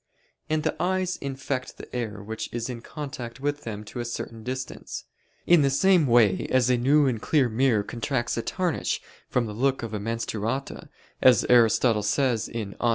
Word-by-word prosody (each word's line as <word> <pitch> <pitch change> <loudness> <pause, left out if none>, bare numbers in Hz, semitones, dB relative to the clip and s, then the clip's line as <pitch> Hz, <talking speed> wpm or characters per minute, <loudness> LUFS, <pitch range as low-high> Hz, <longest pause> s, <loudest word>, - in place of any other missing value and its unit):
And 155 0 +1
the 155 - 0
eyes 185 0 0
infect 135 -1 -4
the - - -10
air 110 -4 -4
which 110 +2 -5
is 120 +1 -3
in 120 -2 -7
contact 135 -4 -7
with 145 +1 -2
them 105 -2 -5
to 120 - -8
a - - -1
certain 115 -1 -5
distance: 130 +3 -5 0.4
in 175 -2 +6
the 140 - +3
same 170 +3 +4
way 115 -6 +4
as 125 -1 +3
a 125 - +3
new 140 +5 +4
and 120 -5 0
clear 145 -5 +3
mirror 115 -2 +2
contracts 120 +2 -2
a 115 - -1
tarnish 180 +4 -1 0.3
from 125 -1 +1
the 105 - -5
look 130 +3 0
of 115 -2 -5
a 105 - -2
"menstruata," 115 +3 -3 0.3
as 125 -5 +6
Aristotle 115 -2 +5
says 115 +2 +1
(De 115 -1 -4
Somn. - - -23
125 Hz, 185 wpm, -26 LUFS, 115-140 Hz, 0.4 s, in